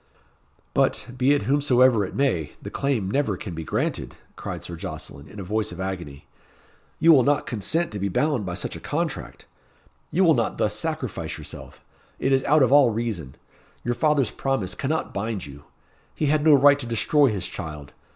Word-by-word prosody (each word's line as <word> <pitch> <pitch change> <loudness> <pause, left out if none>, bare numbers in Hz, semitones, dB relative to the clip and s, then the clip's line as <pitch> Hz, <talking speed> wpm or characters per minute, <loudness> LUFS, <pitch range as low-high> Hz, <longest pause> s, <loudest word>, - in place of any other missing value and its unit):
"But, - - +1
be 130 +3 +3
it 145 - -1
whomsoever 130 -3 +4
it 95 - -6
may, 90 - 0
the - - -8
claim 125 -9 -1
never 125 -8 0
can 95 -2 -6
be 80 0 -5
granted," - - -2 0.2
cried - - -6
Sir 85 - -6
Jocelyn, 70 -3 -7
in 105 - -11
a - - -4
voice 105 +2 -1
of 90 - -9
agony. 90 -7 -5 0.7
"You 165 - +6
will 135 - +6
not 145 +3 +2
consent 130 - -1
to 105 - -5
be 100 +1 -1
bound 145 +3 +1
by 90 -2 -4
such - - -4
a - - -7
contract. - - -4 0.6
You 185 +5 +2
will 165 -3 +6
not 120 -5 0
thus - - +1
sacrifice - - -3
yourself. - - -10 0.3
It 135 - +1
is 130 -1 +3
out 150 -1 +5
of 130 - +2
all 140 -3 +7
reason. 105 - -3 0.5
Your 120 - 0
father's 140 0 +2
promise 135 -9 -2
cannot 155 +4 -2
bind 100 -1 -3
you. 70 0 -12 0.5
He 155 - -1
had 150 +1 +2
no 155 -2 +7
right 140 +1 +6
to 120 - -4
destroy 140 +5 +3
his 100 -7 -2
child. 75 -3 -7
120 Hz, 190 wpm, -24 LUFS, 95-140 Hz, 0.7 s, all